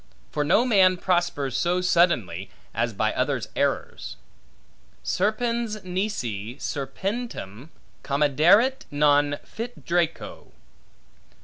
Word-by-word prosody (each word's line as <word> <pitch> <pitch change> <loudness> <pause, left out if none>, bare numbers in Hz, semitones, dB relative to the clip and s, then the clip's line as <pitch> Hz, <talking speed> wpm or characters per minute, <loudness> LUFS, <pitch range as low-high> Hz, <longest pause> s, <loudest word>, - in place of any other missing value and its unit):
For 150 - 0
no 215 +11 +3
man 190 -6 +4
prospers 175 -7 0
so 175 +1 +1
suddenly, 120 - +1 0.2
as 115 +1 0
by 110 +1 0
others' 130 -3 -1
errors. - - -2 0.9
Serpens 220 +2 -1
nisi 135 - -3
serpentem 145 - -5 0.3
comederit 165 - +3
non 145 0 +3
fit 240 +2 -8
draco. 170 -1 -2
170 Hz, 90 wpm, -25 LUFS, 135-200 Hz, 0.9 s, man